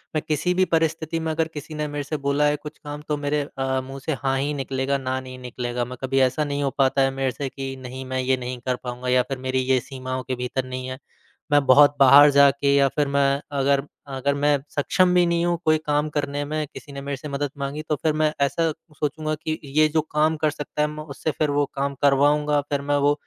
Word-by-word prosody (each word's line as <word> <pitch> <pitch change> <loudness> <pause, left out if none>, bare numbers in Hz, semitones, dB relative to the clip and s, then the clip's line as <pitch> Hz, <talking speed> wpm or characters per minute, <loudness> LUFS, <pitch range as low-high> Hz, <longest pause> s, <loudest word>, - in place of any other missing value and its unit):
मैं 155 - +1
किसी 160 +4 +1
भी 185 +1 +3
परिस्थिति 160 0 0
में 160 0 -2
अगर 160 0 0
किसी 150 +1 -7
ने 150 0 -2
मेरे 145 0 -4
से 155 +2 -3
बोला 140 +1 +1
है 145 0 +3
कुछ 150 +1 -9
काम 145 0 -8
तो 150 -1 0
मेरे 145 +1 0 0.2
अ, 130 0 0
मुँह 135 +1 -8
से 160 - 0
हाँ 135 0 +1
ही 145 +2 -1
निकलेगा 135 0 -1
ना 130 -1 -2
नहीं 130 -1 -9
निकलेगा। 125 -1 -3
मैं 125 +1 -8
कभी 135 +1 +1
ऐसा 150 +3 -2
नहीं 145 0 -2
हो 140 - +1
पाता 135 0 +3
है 135 0 +3
मेरे 135 -1 -1
से 135 +2 -4
कि 135 0 -6
नहीं 130 +1 -7
मैं 130 0 -3
ये 130 0 +1
नहीं 125 0 -5
कर 125 - +1
पाऊँगा 125 +1 -5
या 125 0 +4
फिर 135 - -2
मेरी 130 0 -1
ये 130 - +4
सीमाओं 130 -1 -5
के 130 +1 -3
भीतर 125 +1 -3
नहीं 130 0 -5
है, 130 +1 -6 0.5
मैं 145 -1 +4
बहुत 145 +2 +6
बाहर 140 +2 +9
जाके 140 0 +4
या 140 -1 +5
फिर 145 -2 +1
मैं 140 0 +2 0.2
अगर 140 0 +3 0.3
अगर 135 +1 0
मैं 145 0 +3
सक्षम 180 +5 +2
भी 180 -1 +5
नहीं 170 0 +1
हूँ 175 -1 +1
कोई 155 0 +4
काम 150 +1 +1
करने 145 -1 -2
में, 155 +1 -2
किसी 145 - -10
ने 140 - -6
मेरे 140 -1 -4
से 150 - -8
मदद 140 0 -2
माँगी 140 +2 -4
तो 150 - +2
फिर 155 - +2
मैं 155 0 +2
ऐसा 165 +4 +2 0.3
सोचूँगा 155 +1 -2
कि 155 +1 -4
ये 150 +2 +3
जो 155 - +3
काम 155 +1 +2
कर 155 0 +1
सकता 150 0 -4
है 150 - +3
मैं 150 0 -7
उससे 150 +1 -3
फिर 150 0 -1
वो 145 0 +2
काम 140 0 -1
करवाऊँगा, 145 +1 +3
फिर 140 0 -3
मैं 145 +1 0
वो 145 +1 +3
140 Hz, 245 wpm, -23 LUFS, 135-150 Hz, 0.5 s, बाहर